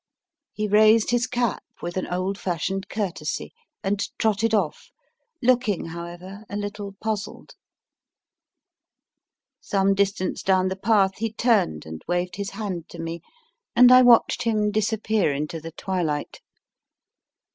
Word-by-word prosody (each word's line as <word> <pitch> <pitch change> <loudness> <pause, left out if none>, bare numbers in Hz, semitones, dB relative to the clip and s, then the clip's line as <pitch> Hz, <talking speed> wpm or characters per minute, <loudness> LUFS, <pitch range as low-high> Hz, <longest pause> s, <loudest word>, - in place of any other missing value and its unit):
He 215 0 -2
raised 215 +2 +5
his 245 0 +1
cap 240 -4 -1 0.2
with 175 0 -5
an 185 - -2
old 185 +2 -2
fashioned 190 +2 -2
courtesy 200 -5 -3 0.3
and 195 +1 0 0.2
trotted 220 +1 +1
off, 195 -9 -1 0.5
looking 240 -7 +2
however 175 +4 -8
a 200 - -5
little 205 -1 -5
puzzled. 215 -2 -4 2.1
Some 195 0 +1
distance 195 -1 0
down 185 -1 +2
the 190 - -3
path, 195 -1 +2
he 225 0 -1
turned 215 - +1
and 80 0 -8
waved 175 +2 -1
his 200 0 -3
hand 190 -8 -5
to - - -11
me, 165 0 -5 0.5
and 250 +1 +8
I 255 0 +9
watched 245 -2 +5
him 215 -3 +1
disappear 215 -3 +1
into 150 +3 -4
the 165 +1 -7
twilight. 170 -4 -3
200 Hz, 130 wpm, -24 LUFS, 180-220 Hz, 2.1 s, I